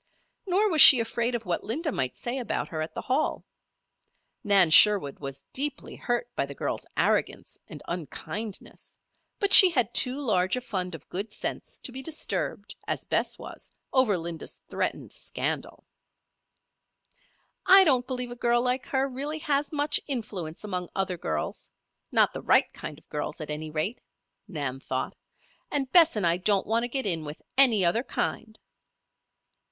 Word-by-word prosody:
Nor 390 Hz, +4 st, +2 dB
was 315 Hz, -3 st, +6 dB
she 265 Hz, -, +12 dB
afraid 235 Hz, +1 st, -1 dB
of 230 Hz, -2 st, -5 dB
what 175 Hz, -2 st, -2 dB
Linda 300 Hz, -, -3 dB
might 130 Hz, -, -2 dB
say 245 Hz, +2 st, -4 dB
about 245 Hz, -, -3 dB
her 160 Hz, -1 st, -4 dB
at 155 Hz, -, -6 dB
the -, -, -5 dB
Hall. 275 Hz, +4 st, -1 dB, 1.0 s
Nan 195 Hz, -5 st, +4 dB
Sherwood 195 Hz, -6 st, +6 dB
was 135 Hz, -1 st, -7 dB
deeply 290 Hz, +2 st, -2 dB
hurt 240 Hz, -1 st, -2 dB
by 140 Hz, -, -1 dB
the 140 Hz, -, -9 dB
girl's -, -, -4 dB
arrogance -, -, -1 dB
and -, -, -11 dB
unkindness; 185 Hz, +5 st, -7 dB, 0.4 s
but 400 Hz, -1 st, +1 dB
she 375 Hz, -, +12 dB
had 250 Hz, -, 0 dB
too 255 Hz, +3 st, +3 dB
large 190 Hz, -8 st, 0 dB
a 250 Hz, -, -4 dB
fund 185 Hz, -6 st, -4 dB
of -, -, -14 dB
good 200 Hz, +4 st, -4 dB
sense -, -, -5 dB
to -, -, -6 dB
be 260 Hz, +2 st, -6 dB
disturbed, 310 Hz, +2 st, -3 dB
as -, -, -3 dB
Bess -, -, -1 dB
was, -, -, -9 dB, 0.2 s
over 255 Hz, -7 st, +3 dB
Linda's 165 Hz, -1 st, -5 dB
threatened -, -, -4 dB
scandal. -, -, -5 dB, 1.8 s
"I 385 Hz, +1 st, +8 dB
don't 255 Hz, -7 st, +1 dB
believe 250 Hz, -2 st, -4 dB
a -, -, -6 dB
girl 240 Hz, 0 st, +1 dB
like 250 Hz, +1 st, -2 dB
her 270 Hz, 0 st, 0 dB
really 280 Hz, +4 st, -5 dB
has 290 Hz, -2 st, -1 dB
much 295 Hz, 0 st, +2 dB
influence 210 Hz, -, -4 dB
among 180 Hz, -4 st, -5 dB
other 190 Hz, -2 st, -2 dB
girls 80 Hz, -, -5 dB, 0.4 s
not -, -, +3 dB
the -, -, -6 dB
right -, -, +2 dB
kind 150 Hz, -, -8 dB
of 160 Hz, -, -22 dB
girls, 150 Hz, 0 st, -5 dB
at 155 Hz, -1 st, -6 dB
any 155 Hz, +1 st, -5 dB
rate," 155 Hz, +10 st, -3 dB, 0.5 s
Nan 140 Hz, -8 st, -5 dB
thought. 130 Hz, -1 st, -4 dB, 0.5 s
"And 270 Hz, -2 st, -2 dB
Bess 330 Hz, -5 st, +5 dB
and 205 Hz, -4 st, -1 dB
I 170 Hz, +1 st, +2 dB
don't 195 Hz, +1 st, +1 dB
want 225 Hz, +2 st, 0 dB
to -, -, -4 dB
get 265 Hz, +1 st, -3 dB
in 170 Hz, -5 st, 0 dB
with 150 Hz, +2 st, -9 dB
any 240 Hz, -8 st, +5 dB
other 195 Hz, +7 st, +1 dB
kind." 225 Hz, -3 st, -4 dB
225 Hz, 170 wpm, -26 LUFS, 175-265 Hz, 1.8 s, she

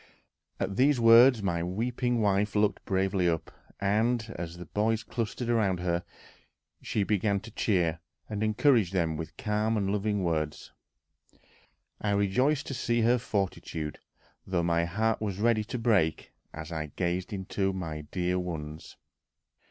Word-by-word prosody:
At 95 Hz, -, -2 dB
these 135 Hz, 0 st, +4 dB
words 115 Hz, 0 st, +7 dB
my 85 Hz, -3 st, 0 dB
weeping 120 Hz, +6 st, -1 dB
wife 100 Hz, 0 st, +1 dB
looked 105 Hz, 0 st, +1 dB
bravely 95 Hz, -1 st, +1 dB
up, 80 Hz, -1 st, -2 dB, 0.3 s
and, 110 Hz, +3 st, +1 dB
as 85 Hz, 0 st, -6 dB
the 90 Hz, -, -8 dB
boys 110 Hz, +5 st, 0 dB
clustered 115 Hz, +1 st, -3 dB
round 105 Hz, -6 st, +1 dB
her, 85 Hz, -1 st, 0 dB, 0.8 s
she 105 Hz, -, -1 dB
began 100 Hz, 0 st, +1 dB
to 115 Hz, +1 st, -11 dB
cheer 90 Hz, -7 st, +1 dB, 0.3 s
and 105 Hz, -1 st, -4 dB
encourage 110 Hz, -, +3 dB
them 85 Hz, -4 st, +1 dB
with 80 Hz, +1 st, -7 dB
calm 105 Hz, +1 st, 0 dB
and 100 Hz, -2 st, 0 dB
loving 105 Hz, -1 st, 0 dB
words. 80 Hz, -3 st, -2 dB, 1.3 s
I 105 Hz, -1 st, 0 dB
rejoiced 125 Hz, +9 st, +2 dB
to -, -, -5 dB
see 120 Hz, -2 st, 0 dB
her 120 Hz, +2 st, +3 dB
fortitude, 90 Hz, -8 st, -3 dB, 0.5 s
though 90 Hz, -2 st, 0 dB
my 85 Hz, 0 st, +2 dB
heart 110 Hz, +6 st, 0 dB
was 100 Hz, -4 st, -2 dB
ready 110 Hz, 0 st, +2 dB
to 120 Hz, -, -4 dB
break 105 Hz, -10 st, +1 dB, 0.2 s
as 80 Hz, +1 st, -8 dB
I 80 Hz, -2 st, -3 dB
gazed 90 Hz, +2 st, -1 dB, 0.3 s
on 95 Hz, -1 st, +2 dB
my 80 Hz, -5 st, -4 dB
dear 90 Hz, 0 st, 0 dB
ones.... 80 Hz, -3 st, -6 dB
100 Hz, 145 wpm, -29 LUFS, 85-110 Hz, 1.3 s, words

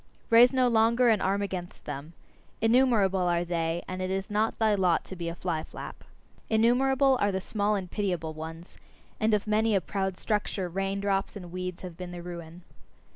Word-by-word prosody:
Raise 235 Hz, +2 st, +8 dB
no 260 Hz, -2 st, +3 dB
longer 235 Hz, +1 st, +4 dB
an 215 Hz, -3 st, +3 dB
arm 200 Hz, +2 st, +1 dB
against 185 Hz, -3 st, -6 dB
them! 145 Hz, +3 st, -6 dB, 0.5 s
Innumerable 225 Hz, -5 st, +3 dB
are 175 Hz, -1 st, +1 dB
they, 170 Hz, 0 st, -1 dB
and 185 Hz, 0 st, -5 dB
it 185 Hz, -, -2 dB
is 195 Hz, +2 st, -3 dB
not 215 Hz, +2 st, 0 dB
thy 220 Hz, -1 st, +3 dB
lot 180 Hz, -4 st, +2 dB
to 190 Hz, -, -8 dB
be 170 Hz, -2 st, -4 dB
a 170 Hz, -, -6 dB
fly 165 Hz, -3 st, -2 dB
flap. -, -, -9 dB, 0.5 s
Innumerable 260 Hz, +4 st, +3 dB
are 205 Hz, -, +3 dB
the 190 Hz, -, -1 dB
small 205 Hz, +2 st, 0 dB
and 195 Hz, -2 st, -2 dB
pitiable 180 Hz, -6 st, -2 dB
ones; 160 Hz, +2 st, -9 dB, 0.4 s
and 220 Hz, +1 st, +2 dB
of 205 Hz, -, -2 dB
many 215 Hz, 0 st, +2 dB
a -, -, +4 dB
proud 190 Hz, 0 st, -3 dB
structure, 205 Hz, -3 st, -1 dB
rain 195 Hz, +2 st, -2 dB
drops 195 Hz, 0 st, -1 dB
and 180 Hz, -4 st, -8 dB
weeds 180 Hz, 0 st, -5 dB
have 180 Hz, -3 st, -8 dB
been 180 Hz, -1 st, -6 dB
the 175 Hz, -1 st, -7 dB
ruin. 170 Hz, 0 st, -9 dB
195 Hz, 190 wpm, -28 LUFS, 175-220 Hz, 0.5 s, Raise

